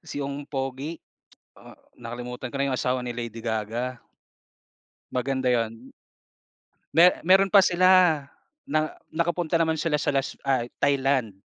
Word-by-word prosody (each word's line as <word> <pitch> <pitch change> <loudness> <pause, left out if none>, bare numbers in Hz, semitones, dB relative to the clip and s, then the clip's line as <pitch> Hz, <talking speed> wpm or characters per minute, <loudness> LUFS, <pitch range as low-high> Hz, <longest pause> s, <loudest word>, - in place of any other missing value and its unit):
si 145 -1 -4
yung 140 +1 -6
pogi. 135 +3 -4 0.6
Oh - - -16 0.2
nakalimutan 125 +1 -7
ko 140 - -10
na 140 - +1
yung - - -1
asawa 125 0 -1
ni 120 - -4
Lady 115 -1 -6
Gaga. 115 +3 -3 1.1
Maganda 130 0 -1
yun. 115 +1 -2 1.1
Me 175 +2 +9 0.2
meron 195 +1 +6
pa 200 -2 +7
sila 185 +1 +3 0.8
na 155 - +3 0.4
nakapunta 170 0 0
naman 160 -1 +1
sila 165 -3 0
sa 150 0 0
las 135 -1 -1
ay 130 -3 0 0.2
Thailand. 135 -8 +1
135 Hz, 135 wpm, -25 LUFS, 120-155 Hz, 1.1 s, Me